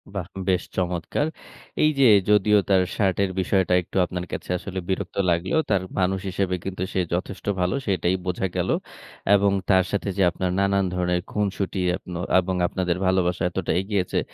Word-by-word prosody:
বাহ! 90 Hz, -4 st, -3 dB, 0.2 s
বেশ 90 Hz, -1 st, +2 dB
চমৎকার। 90 Hz, -, -1 dB, 0.6 s
এই 155 Hz, -, +6 dB
যে 135 Hz, -, +7 dB, 0.2 s
যদিও 105 Hz, 0 st, +5 dB
তার 95 Hz, -2 st, +5 dB
শার্টের 100 Hz, -1 st, +1 dB
বিষয়টা 95 Hz, -1 st, +1 dB
একটু 90 Hz, -, -7 dB
আপনার 90 Hz, 0 st, -5 dB
কাছে -, -, -5 dB
আসলে 95 Hz, +1 st, -5 dB
বিরক্ত 95 Hz, 0 st, -2 dB
লাগলেও 85 Hz, -, +1 dB
তার 100 Hz, -3 st, +2 dB, 0.2 s
মানুষ 95 Hz, +1 st, +1 dB
হিসেবে 95 Hz, 0 st, -1 dB
কিন্তু 95 Hz, -1 st, -5 dB
সে -, -, 0 dB
যথেষ্ট 90 Hz, +2 st, -4 dB, 0.2 s
ভালো 90 Hz, +1 st, +1 dB
সেটাই 95 Hz, -2 st, +1 dB
বোঝা 90 Hz, +1 st, -1 dB
গেল। -, -, 0 dB, 0.7 s
এবং 100 Hz, 0 st, +3 dB, 0.2 s
তার 95 Hz, -1 st, +5 dB
সাথে 100 Hz, 0 st, -1 dB
যে 95 Hz, -, +3 dB
আপনার 90 Hz, 0 st, -2 dB
নানান 100 Hz, 0 st, +2 dB
ধরণের 90 Hz, -1 st, 0 dB
খুনসুটি 100 Hz, -2 st, -1 dB, 0.2 s
এপনো 90 Hz, -1 st, -7 dB, 0.2 s
এবং 95 Hz, 0 st, -2 dB
আপনাদের 90 Hz, -1 st, -1 dB
ভালোবাসা 95 Hz, -1 st, +1 dB
এতটা 90 Hz, -1 st, -2 dB
এগিয়েছে, 95 Hz, -2 st, -1 dB
95 Hz, 165 wpm, -24 LUFS, 90-100 Hz, 0.7 s, যে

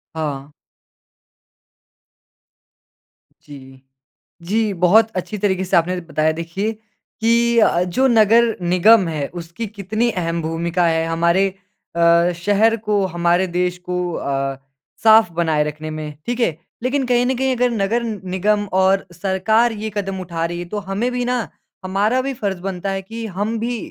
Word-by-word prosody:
हाँ। 145 Hz, -2 st, -4 dB, 2.9 s
जी, 135 Hz, -2 st, -13 dB, 0.6 s
जी, 210 Hz, +3 st, 0 dB
बहुत 205 Hz, +6 st, +4 dB
अच्छी 200 Hz, +3 st, -4 dB
तरीके 190 Hz, -2 st, 0 dB
से 185 Hz, -, +2 dB
आपने 180 Hz, +2 st, +1 dB
बताया 155 Hz, -1 st, 0 dB
देखिए 190 Hz, +6 st, -2 dB, 0.5 s
कि 235 Hz, +1 st, +3 dB
अ 220 Hz, -, +6 dB
अ, 175 Hz, -, +1 dB
जो 185 Hz, +10 st, +1 dB
नगर 230 Hz, 0 st, +4 dB
निगम 180 Hz, +3 st, +4 dB
है, 150 Hz, -4 st, -3 dB
उसकी 175 Hz, +5 st, -7 dB
कितनी 215 Hz, +3 st, -2 dB
अहम 170 Hz, -2 st, -2 dB
भूमिका 170 Hz, +2 st, -1 dB
है 160 Hz, 0 st, +1 dB
हमारे 170 Hz, +4 st, +2 dB, 0.5 s
अ, 170 Hz, +1 st, +4 dB
शहर 205 Hz, +5 st, +2 dB
को, 210 Hz, -3 st, 0 dB
हमारे 175 Hz, +1 st, +1 dB
देश 180 Hz, 0 st, 0 dB
को 180 Hz, 0 st, -3 dB
अ, 135 Hz, -2 st, -2 dB, 0.5 s
साफ 220 Hz, -5 st, +6 dB
बनाए 160 Hz, -3 st, +1 dB
रखने 150 Hz, +1 st, -5 dB
में, 150 Hz, -1 st, -6 dB
ठीक 240 Hz, 0 st, -3 dB
है। 170 Hz, -10 st, +1 dB, 0.3 s
लेकिन 260 Hz, +1 st, 0 dB
कहीं 245 Hz, 0 st, +2 dB
न 260 Hz, +1 st, 0 dB
कहीं 265 Hz, -1 st, +1 dB
अगर 250 Hz, +1 st, +2 dB
नगर 225 Hz, +2 st, 0 dB
निगम 205 Hz, -1 st, -1 dB
और 190 Hz, +1 st, +3 dB
सरकार 200 Hz, +6 st, +1 dB
ये 220 Hz, 0 st, -5 dB
कदम 195 Hz, -2 st, -3 dB
उठा 170 Hz, -2 st, -3 dB
रही 175 Hz, +1 st, -4 dB
है, 175 Hz, -, -5 dB
तो 210 Hz, +5 st, -6 dB
हमें 225 Hz, +6 st, -1 dB
भी 245 Hz, 0 st, -2 dB
ना 245 Hz, -2 st, -1 dB, 0.4 s
हमारा 205 Hz, +7 st, +1 dB
भी 270 Hz, +1 st, -3 dB
फर्ज़ 200 Hz, -6 st, -3 dB
बनता 195 Hz, 0 st, -4 dB
है 195 Hz, -, -3 dB
कि 225 Hz, +4 st, -7 dB
हम 220 Hz, +3 st, -1 dB
भी 240 Hz, +2 st, -2 dB
190 Hz, 155 wpm, -20 LUFS, 170-225 Hz, 2.9 s, अ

